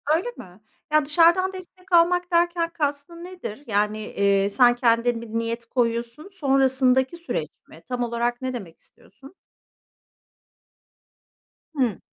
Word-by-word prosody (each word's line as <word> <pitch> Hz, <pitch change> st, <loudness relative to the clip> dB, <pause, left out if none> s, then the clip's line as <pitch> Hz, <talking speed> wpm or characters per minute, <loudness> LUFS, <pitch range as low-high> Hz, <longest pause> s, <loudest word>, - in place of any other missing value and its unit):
Öyle 360 Hz, +9 st, -2 dB
mi? 180 Hz, +3 st, -13 dB, 0.3 s
Ya, 305 Hz, -1 st, +4 dB
dışarıdan 340 Hz, +5 st, +3 dB
destek 370 Hz, 0 st, -12 dB
almak 355 Hz, +1 st, +3 dB
derken, 340 Hz, 0 st, +1 dB
kastın 300 Hz, +2 st, -3 dB
nedir? 355 Hz, -, -8 dB
Yani, 210 Hz, 0 st, 0 dB
eee, 200 Hz, -2 st, +1 dB
sen 240 Hz, +3 st, +4 dB
kendin 235 Hz, -1 st, +1 dB
bir 235 Hz, -, -9 dB
niyet 230 Hz, +1 st, -3 dB
koyuyorsun, 235 Hz, +6 st, -2 dB
sonrasındaki 265 Hz, -2 st, +2 dB
süreç 245 Hz, -, -4 dB, 0.2 s
mi? 160 Hz, -, -16 dB
Tam 245 Hz, -1 st, -2 dB
olarak 240 Hz, +1 st, -2 dB
ne 260 Hz, 0 st, -3 dB
demek 190 Hz, -9 st, -8 dB
istiyorsun? 270 Hz, -, -18 dB, 2.4 s
Hıı. 245 Hz, -8 st, 0 dB
255 Hz, 125 wpm, -23 LUFS, 230-335 Hz, 2.4 s, Ya